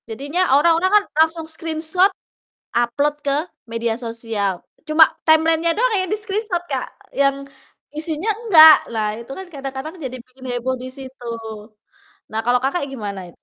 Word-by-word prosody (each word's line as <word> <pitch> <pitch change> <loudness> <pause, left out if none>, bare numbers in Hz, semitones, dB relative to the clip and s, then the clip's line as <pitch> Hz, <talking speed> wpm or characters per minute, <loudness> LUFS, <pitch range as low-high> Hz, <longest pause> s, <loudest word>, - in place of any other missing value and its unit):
Jadinya 285 +10 -3 0.2
orang-orang 335 +4 +3
kan 415 - +2 0.2
langsung 320 0 +1
screenshot 325 +3 +1 0.7
upload 285 +5 +1
ke 280 -1 +2 0.3
media 230 0 -2
sosial 225 -5 -3 0.2
cuma 315 +1 +6 0.2
timeline-nya 325 +2 +3
doang - - +2
ya 375 -2 +1
di 425 - 0
screenshot, 420 -3 -2
Kak, 270 -6 -3 0.2
yang 275 0 +1 0.5
isinya 315 +5 -2
enggak, 340 -9 +8
nah 220 -2 -1
itu 235 +3 -10
kan 380 - -7
kadang-kadang 275 +2 -6
jadi 255 0 -5
bikin 255 +1 -16
heboh 245 +1 -2
di 255 - -6
situ. 260 -1 -11 1.1
Nah 220 - -1
kalau, 245 +1 +3
Kakak, 280 +3 0
gimana? 200 -7 -6
285 Hz, 145 wpm, -20 LUFS, 245-330 Hz, 1.1 s, enggak